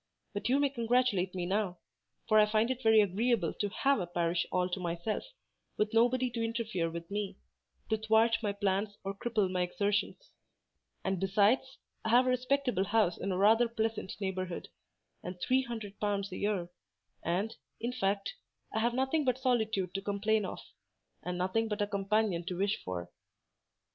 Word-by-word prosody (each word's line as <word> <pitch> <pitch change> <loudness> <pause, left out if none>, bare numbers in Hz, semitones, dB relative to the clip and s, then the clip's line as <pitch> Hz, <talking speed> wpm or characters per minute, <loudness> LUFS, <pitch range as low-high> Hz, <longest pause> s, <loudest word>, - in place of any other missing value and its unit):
But 205 +3 -2
you 265 - +4
may 285 -1 +2
congratulate 235 -7 +1
me 180 -1 -2
now; 190 -1 0 0.5
for 215 -1 +5
I 210 - +6
find 215 +3 +2
it 260 0 -3
very 220 -2 +6
agreeable 205 -1 +1
to 205 - 0
have 275 +5 +2
a 180 - -2
parish 170 0 0
all 180 0 +2
to 185 - -3
myself, 175 +4 -2 0.5
with 215 +1 0
nobody 245 +2 +3
to 230 -1 -2
interfere 225 -7 -1
with 170 +2 -7
me—to 205 +2 -5
thwart 220 +1 +4
my 210 -2 0
plans 200 +1 -1
or 195 0 -3
cripple 215 -1 0
my 180 -1 0
exertions: 205 - -1 0.7
and 190 -2 -1
besides, 210 +8 +2 0.3
I 225 - -1
have 245 +3 +6
a - - +2
respectable 255 -4 +1
house 210 -5 +2
in 195 - -2
a 180 - 0
rather 220 +5 +5
pleasant 225 -3 -2
neighbourhood, 185 -3 -3 0.5
and 180 0 -7
three 260 +6 +2
hundred 225 -5 -7
pounds 200 -1 -1
a - - -5
year; 200 -4 -1 0.5
and, 195 +7 -1 0.2
in 240 +2 -2
fact, 200 - -1 0.4
I - - +1
have 235 +2 +1
nothing 265 +4 +1
but 255 -2 +1
solitude 220 -8 0
to 195 - -2
complain 205 +1 +1
of, - - -5 0.6
and 180 0 -4
nothing 190 +5 0
but 210 -1 -3
a 205 - +2
companion 200 -2 0
to 180 -2 -3
wish 200 +2 0
for." 90 -1 -5
210 Hz, 175 wpm, -32 LUFS, 190-230 Hz, 0.7 s, I